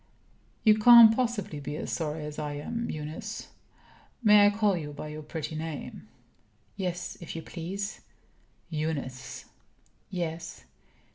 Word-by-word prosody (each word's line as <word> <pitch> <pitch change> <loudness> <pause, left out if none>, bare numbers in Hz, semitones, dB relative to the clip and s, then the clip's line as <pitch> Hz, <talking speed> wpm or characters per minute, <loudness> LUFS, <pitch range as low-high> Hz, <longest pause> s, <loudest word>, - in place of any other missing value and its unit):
"You 215 -1 +6
can't 230 0 +10
possibly 225 - -1
be 145 +1 -5
as - - -4
sorry 155 -2 -3
as 150 0 -6
I 150 -1 -3
am, 230 +11 -4
Eunice. 155 +1 -6 0.7
May 210 -1 +8
I - - +6
call 205 -1 +2
you 150 -4 -5
by 150 +1 -7
your 155 0 -7
pretty 155 +1 -5
name?" 155 -7 -6 0.7
"Yes, 180 -1 -4
if 170 - -7
you 165 - -5
please." 195 +4 -5 0.7
"Eunice!" 150 -5 -4 0.6
"Yes." 170 -2 -4
165 Hz, 130 wpm, -28 LUFS, 150-205 Hz, 0.7 s, can't